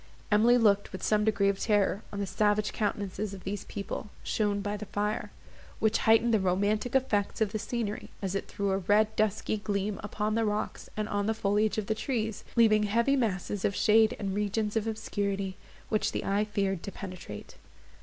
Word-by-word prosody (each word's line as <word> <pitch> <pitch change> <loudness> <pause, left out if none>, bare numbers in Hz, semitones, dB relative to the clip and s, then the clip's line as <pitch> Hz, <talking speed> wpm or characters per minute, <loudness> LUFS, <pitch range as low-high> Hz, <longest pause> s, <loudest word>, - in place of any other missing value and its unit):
Emily 230 +4 +5
looked 205 -3 +3
with 190 - -7
some 210 -1 +2
degree 210 -2 +2
of 200 0 +1
terror 205 -1 +2
on 205 - -5
the 200 - 0
savage 210 +2 +1
countenances 200 -1 -2
of 190 - -11
these 195 +1 -4
people, 200 +1 -5
shown 205 -2 0
by 205 +1 -2
the 210 0 -7
fire, 210 +2 -2 0.5
which 220 0 +2
heightened 225 +1 +5
the 220 - +4
romantic 205 +6 0
effects 210 -6 +1
of 215 -3 +1
the 215 - -2
scenery, 225 -2 -3
as 195 -2 -3
it 195 - -2
threw 200 -1 -2
a 190 - +1
red 210 +3 +2
dusky 215 0 0
gleam 205 -1 -2
upon 210 +1 -2
the 225 +1 +2
rocks 210 0 -2
and 215 0 -1
on 205 -1 -1
the 220 - +1
foliage 210 0 +1
of 215 - -1
the 220 - 0
trees, 220 -2 -2
leaving 220 -3 +5
heavy 235 +6 +2
masses 205 -5 -1
of 195 - +1
shade 220 0 +4
and 195 -2 -3
regions 210 +1 -1
of 225 0 0
obscurity, 200 -3 -2 0.3
which 215 - +1
the - - -2
eye 200 +2 +1
feared 195 -3 -1
to 200 - -6
penetrate. 180 - -8
210 Hz, 195 wpm, -29 LUFS, 200-220 Hz, 0.5 s, Emily